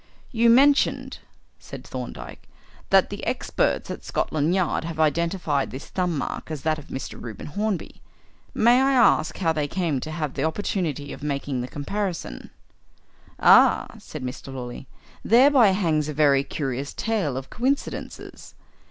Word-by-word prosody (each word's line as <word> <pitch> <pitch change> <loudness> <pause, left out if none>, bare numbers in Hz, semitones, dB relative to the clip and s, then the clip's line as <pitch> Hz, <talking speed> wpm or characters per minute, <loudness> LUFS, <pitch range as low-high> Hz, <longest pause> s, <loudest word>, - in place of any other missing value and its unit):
"You 235 -2 +3
mentioned," 275 +4 +3 0.4
said - - -10
Thorndyke, - - -8 0.4
"that - - +4
the - - -6
experts - - -1
at - - -7
Scotland 155 +3 0
Yard 185 -4 0
have 160 -1 -6
identified 160 -2 0
this 130 - -9
thumb 180 -4 -1
mark 140 - -4
as 155 -3 -5
that 155 -1 0
of 150 - -13
Mr. 130 - -7
Reuben 115 -3 -8
Hornby. 200 +5 -3 0.5
May 240 +3 +5
I 270 +1 +3
ask 235 -10 +3
how 165 -4 +1
they 150 -2 -1
came 165 -4 -1
to 155 - -6
have 155 -3 -3
the - - -2
opportunity 160 -4 -2
of - - -10
making 140 -3 -2
the 125 - -4
comparison?" 170 - -4 0.9
"Ah!" - - +5
said - - -9
Mr. 130 +1 -6
Lawley. 125 0 -7 0.4
"Thereby 255 +1 +6
hangs 165 -6 +1
a 150 - -5
very 140 -2 +4
curious 140 -1 -4
tale 200 - -1
of 130 0 -7
coincidences. 265 +4 -4
155 Hz, 150 wpm, -24 LUFS, 140-200 Hz, 0.9 s, Thereby